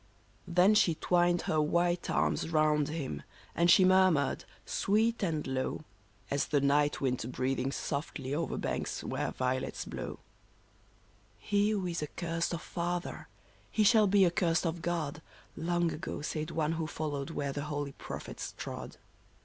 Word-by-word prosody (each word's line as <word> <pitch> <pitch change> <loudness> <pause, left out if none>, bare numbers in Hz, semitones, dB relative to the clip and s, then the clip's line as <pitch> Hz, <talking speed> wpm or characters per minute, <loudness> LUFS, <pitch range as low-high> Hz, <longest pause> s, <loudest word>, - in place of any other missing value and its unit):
Then 180 +4 +5
she 175 -6 +4
twined 175 +1 +2
her 155 -1 +1
white 175 +3 +1
arms 75 - +1
round 155 -2 +3
him, 145 - -4 0.3
and 170 +1 +3
she 185 - +7
mur 185 0 +6
mured, 145 -5 0 0.2
sweet 220 +3 +1
and 160 -6 -1
low, 130 +2 -2 0.5
As 140 - +1
the 145 - +2
night 145 +1 +2
wind 125 -3 0
breathing 130 +1 -1
softly 140 -1 -3
over 165 +3 -1
banks - - -3
where - - -2
violets 130 0 -2
blow: - - -6 1.2
He 205 0 +1
who 205 -3 0
is 170 -2 -2
accursed 165 +2 -2
of 170 -3 -4
father, 175 +1 -3 0.4
he 215 - +2
shall 215 0 +6
be 195 0 +5
accursed 170 -1 +2
of 165 0 -2
God,' 160 -4 -2 0.3
Long 175 +1 0
ago 150 -1 -5
said 155 0 -3
one 155 -1 0
who 165 -1 -2
followed 145 -2 -3
where 145 -3 -3
the 145 +1 -3
holy 145 -1 -3
prophets - - -7
trod. - - -6
160 Hz, 150 wpm, -31 LUFS, 145-175 Hz, 1.2 s, she